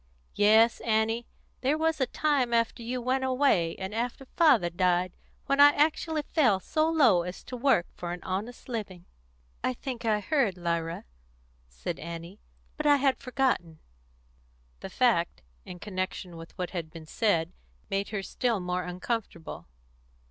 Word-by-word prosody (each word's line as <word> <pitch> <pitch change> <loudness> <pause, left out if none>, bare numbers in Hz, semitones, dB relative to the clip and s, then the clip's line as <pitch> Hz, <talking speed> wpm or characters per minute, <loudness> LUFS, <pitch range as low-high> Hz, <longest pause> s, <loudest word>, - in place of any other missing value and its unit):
Yes, 220 +3 +5
Annie, 225 +1 0 0.3
there 275 +4 +2
was 320 -2 0
a 260 - +2
time 265 -5 +1
after 230 0 0
you 245 +2 -3
went 255 +2 0
away, 255 -11 +2
and 190 +1 -6
after 240 +4 -3
father 260 - +4
died, 180 0 +1 0.3
when 275 0 +1
I 290 0 +9
actually 310 +1 +1
fell 250 - +2
so 310 - 0
low 265 - +5
as 180 +1 -7
to 255 - -7
work 245 -8 +3
for 175 -1 -6
an 175 0 -6
honest 205 +6 -4
living." 200 -8 -5 0.6
"I 130 - +1
think 250 -3 -6
I 215 -2 +2
heard, 235 - +1
Lyra," 170 -1 -2 0.6
said - - -5
Annie; 170 +4 -8 0.4
"but 305 -1 0
I 290 - +7
had 275 -1 +2
forgotten." 255 - -1 1.0
The - - -7
fact, 65 -2 +1 0.2
in 180 - -8
connection 185 -2 -4
with 165 +2 -11
what 180 -2 -3
had 170 -4 -4
been 160 0 -11
said, 170 -2 0 0.4
made 195 +1 -1
her 205 -2 -3
still 230 +2 -1
more 180 0 -2
uncomfortable. 180 - -5
215 Hz, 155 wpm, -28 LUFS, 180-260 Hz, 1.0 s, I